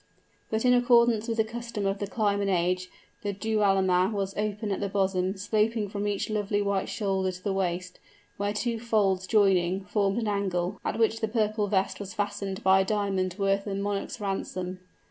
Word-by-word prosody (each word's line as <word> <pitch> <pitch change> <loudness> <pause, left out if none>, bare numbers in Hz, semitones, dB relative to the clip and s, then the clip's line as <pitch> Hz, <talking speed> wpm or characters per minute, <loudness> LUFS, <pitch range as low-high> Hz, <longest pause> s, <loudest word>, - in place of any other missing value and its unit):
But 220 +2 -1
in 250 - +6
accordance 240 -2 +4
with 230 -1 -2
the 220 - +4
custom 230 -2 -5
of 195 +1 0
the 205 - -2
clime 205 -1 0
and 200 - 0
age, 180 0 0 0.3
the 205 -1 -2
dualma 195 -3 +2
was 195 -2 -2
open 210 0 -2
at 195 - -1
the 200 - -2
bosom, 190 -1 0
sloping 215 +1 0
from 205 +1 -3
each 205 -1 -1
lovely 205 -1 0
white 200 -1 0
shoulder 190 -2 0
to 180 0 -11
the 200 - 0
waist, 185 -1 -2 0.4
where 205 0 -1
the 210 - -4
two 235 0 -1
folds 200 -5 +1
joining, 190 -3 +3
formed 200 +1 0
an 230 -2 -1
angle, 195 -2 -1
at - - -2
which 225 0 +2
the 220 - 0
purple 215 -1 0
vest 190 -1 0
was 200 +1 -7
fastened 205 -2 -3
by 190 0 +6
a - - +4
diamond 195 -3 0
worth 195 0 +1
a 195 - -2
monarch's 200 +3 -3
ransom. 185 -2 -3
200 Hz, 195 wpm, -27 LUFS, 190-215 Hz, 0.4 s, in